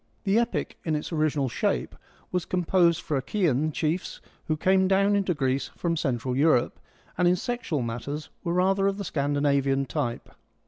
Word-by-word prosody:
The 200 Hz, +4 st, +3 dB
Epic, 235 Hz, 0 st, -2 dB
in 160 Hz, -2 st, 0 dB
its 150 Hz, +3 st, -4 dB
original 155 Hz, -3 st, +1 dB
shape, 65 Hz, -, -1 dB, 0.4 s
was 180 Hz, -2 st, 0 dB
composed 175 Hz, -2 st, +2 dB
for -, -, -4 dB
the -, -, +2 dB
Achaean 155 Hz, -1 st, 0 dB
chiefs 160 Hz, +4 st, -2 dB, 0.3 s
who 155 Hz, -, 0 dB
came 190 Hz, +3 st, +3 dB
down 195 Hz, +2 st, +3 dB
into 195 Hz, -3 st, +1 dB
Greece 130 Hz, -1 st, 0 dB
from 170 Hz, -1 st, 0 dB
Central 130 Hz, -5 st, -1 dB
Europe, 140 Hz, -3 st, +2 dB, 0.4 s
and 180 Hz, -, +4 dB
in 180 Hz, -, +4 dB
sexual 185 Hz, -, -2 dB
matters 130 Hz, +6 st, -5 dB
were 170 Hz, -, -1 dB
rather 195 Hz, +2 st, +2 dB
of 195 Hz, 0 st, 0 dB
the 200 Hz, -, -4 dB
Scandinavian 140 Hz, -2 st, +1 dB
type. 120 Hz, -2 st, -3 dB
155 Hz, 170 wpm, -26 LUFS, 140-185 Hz, 0.4 s, and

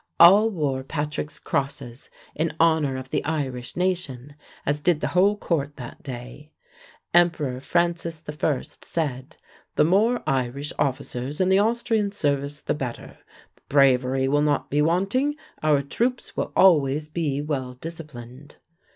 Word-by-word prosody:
All 200 Hz, +6 st, +8 dB
wore 145 Hz, -9 st, -1 dB
Patrick's 150 Hz, +1 st, -4 dB
crosses 135 Hz, -3 st, -4 dB, 0.2 s
in 160 Hz, 0 st, -2 dB
honor 160 Hz, -5 st, +3 dB
of 130 Hz, 0 st, -8 dB
the -, -, 0 dB
Irish 135 Hz, -6 st, -3 dB
nation, 160 Hz, -8 st, -2 dB, 0.3 s
as 145 Hz, +1 st, 0 dB
did 160 Hz, 0 st, +2 dB
the -, -, -1 dB
whole 200 Hz, +4 st, +3 dB
court 150 Hz, -7 st, -2 dB
that 120 Hz, -2 st, -9 dB
day. 130 Hz, +3 st, -9 dB, 0.6 s
Emperor 165 Hz, -7 st, +3 dB
Francis 170 Hz, +1 st, -1 dB
I. 150 Hz, -2 st, -1 dB, 0.2 s
said: 145 Hz, -3 st, -3 dB, 0.4 s
"The -, -, +4 dB
more 210 Hz, +9 st, +3 dB
Irish 135 Hz, +2 st, -1 dB
officers 135 Hz, 0 st, -2 dB
in 185 Hz, 0 st, +3 dB
the 190 Hz, +1 st, +5 dB
Austrian 225 Hz, -1 st, +1 dB
service 145 Hz, -5 st, -1 dB
the -, -, -1 dB
better; 130 Hz, -5 st, -6 dB, 0.5 s
bravery 130 Hz, -1 st, +3 dB
will 145 Hz, +2 st, +2 dB
not 150 Hz, -1 st, 0 dB
be 145 Hz, +1 st, +2 dB
wanting; 195 Hz, -, +1 dB, 0.3 s
our 150 Hz, -2 st, +3 dB
troops 240 Hz, -, -2 dB
will -, -, -2 dB
always 150 Hz, -5 st, +4 dB
be 155 Hz, -3 st, -2 dB
well 135 Hz, -4 st, -3 dB
disciplined." 145 Hz, -3 st, -10 dB
150 Hz, 135 wpm, -24 LUFS, 135-170 Hz, 0.6 s, All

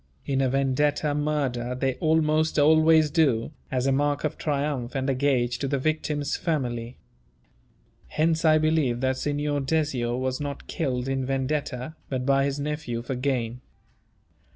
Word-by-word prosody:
In 135 Hz, -1 st, 0 dB
a 130 Hz, -, +2 dB
Vendetta 140 Hz, +3 st, +1 dB
murder 140 Hz, -5 st, -1 dB
they 130 Hz, 0 st, 0 dB
almost 155 Hz, 0 st, +2 dB
always 155 Hz, +1 st, +5 dB
do, 140 Hz, -7 st, +2 dB, 0.2 s
as 130 Hz, -1 st, 0 dB
a 135 Hz, -, +3 dB
mark 145 Hz, +1 st, +1 dB
of 155 Hz, -, -1 dB
triumph 140 Hz, -4 st, -2 dB
and 135 Hz, 0 st, -1 dB
a 135 Hz, -, +2 dB
gage 125 Hz, -3 st, +1 dB
to 140 Hz, -, -1 dB
the 140 Hz, -, 0 dB
victim's 150 Hz, 0 st, -1 dB
family. 125 Hz, -8 st, -2 dB, 1.1 s
Hence 160 Hz, +1 st, +1 dB
I 155 Hz, -1 st, +5 dB
believed 155 Hz, -6 st, +1 dB
that 130 Hz, 0 st, +1 dB
Signor 145 Hz, +1 st, -1 dB
Dezio 135 Hz, -5 st, 0 dB
was 130 Hz, 0 st, -2 dB
not 140 Hz, -1 st, -5 dB
killed 130 Hz, -5 st, -2 dB
in 135 Hz, 0 st, -1 dB
Vendetta, 135 Hz, +1 st, -2 dB
but 130 Hz, -2 st, -2 dB
by 135 Hz, 0 st, +3 dB
his 140 Hz, 0 st, -2 dB
nephew 145 Hz, -5 st, -3 dB
for 130 Hz, -, -3 dB
gain. 125 Hz, -2 st, -2 dB
140 Hz, 150 wpm, -26 LUFS, 130-150 Hz, 1.1 s, always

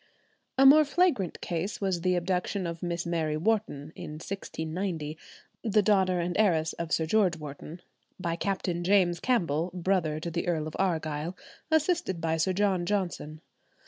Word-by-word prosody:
A 270 Hz, -, +6 dB
more 300 Hz, +3 st, +9 dB
flagrant 300 Hz, -, +1 dB
case 175 Hz, +4 st, -3 dB
was 190 Hz, -4 st, -1 dB
the 180 Hz, +1 st, +2 dB
abduction 180 Hz, +2 st, -1 dB
of 170 Hz, -1 st, -5 dB
Miss 175 Hz, -1 st, -2 dB
Mary 160 Hz, -3 st, -1 dB
Wharton 160 Hz, -6 st, -1 dB
in 150 Hz, -, -7 dB
1690, 160 Hz, -1 st, -4 dB, 0.5 s
the 215 Hz, -2 st, +3 dB
daughter 190 Hz, -3 st, +3 dB
and 175 Hz, +1 st, -2 dB
heiress 165 Hz, -7 st, +3 dB
of 170 Hz, -1 st, -5 dB
Sir 160 Hz, -, +2 dB
George 185 Hz, -1 st, +2 dB
Wharton, 150 Hz, +3 st, -9 dB, 0.4 s
by 170 Hz, -2 st, -1 dB
Captain 180 Hz, -2 st, -2 dB
James 180 Hz, -2 st, +3 dB
Campbell, 175 Hz, -, +1 dB
brother 175 Hz, -4 st, 0 dB
to 170 Hz, +2 st, -4 dB
the 170 Hz, +2 st, -2 dB
Earl 160 Hz, -3 st, 0 dB
of 155 Hz, -, -7 dB
Argyll, 160 Hz, -2 st, -1 dB, 0.3 s
assisted 315 Hz, -, +1 dB
by 165 Hz, 0 st, 0 dB
Sir 165 Hz, +4 st, +1 dB
John 190 Hz, -2 st, +1 dB
Johnson. 175 Hz, -6 st, -2 dB
175 Hz, 155 wpm, -28 LUFS, 160-195 Hz, 0.5 s, more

